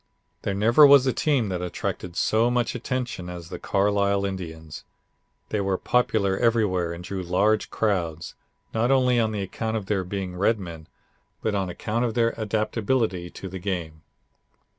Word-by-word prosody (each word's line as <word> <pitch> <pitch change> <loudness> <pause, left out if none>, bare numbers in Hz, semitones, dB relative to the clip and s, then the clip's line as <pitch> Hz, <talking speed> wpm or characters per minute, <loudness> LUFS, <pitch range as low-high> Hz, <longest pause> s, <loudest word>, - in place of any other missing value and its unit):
There 100 - -2
never 115 +9 +6
was 140 -2 +7
a 130 - +2
team 135 -9 +1
that 90 -2 -2
attracted 90 0 -4
so 110 +5 +2
much 120 -1 0
attention 125 -6 -3
as 85 -1 -8
the - - -6
Carlisle 100 0 +1
Indians. 80 -5 -6 0.7
They 105 - 0
were 95 -1 0
popular 110 -5 +1
everywhere 105 -8 +2
and 85 +1 -7
drew 95 +1 -4
large 100 +5 +1
crowds, 85 -7 -1 0.4
not 115 +2 +1
only 125 -2 +4
on 110 -2 0
account 110 +3 -3
of 105 - -5
their 95 -1 0
being 95 0 -4
Redmen, 90 -5 -1 0.6
but 110 - 0
on 95 -2 -1
account 110 +6 -2
of 115 -3 -1
their 115 -1 +2
adaptability 110 -3 -1
to 95 - -8
the 95 0 -6
game. 85 -5 -4
100 Hz, 160 wpm, -25 LUFS, 90-115 Hz, 0.7 s, was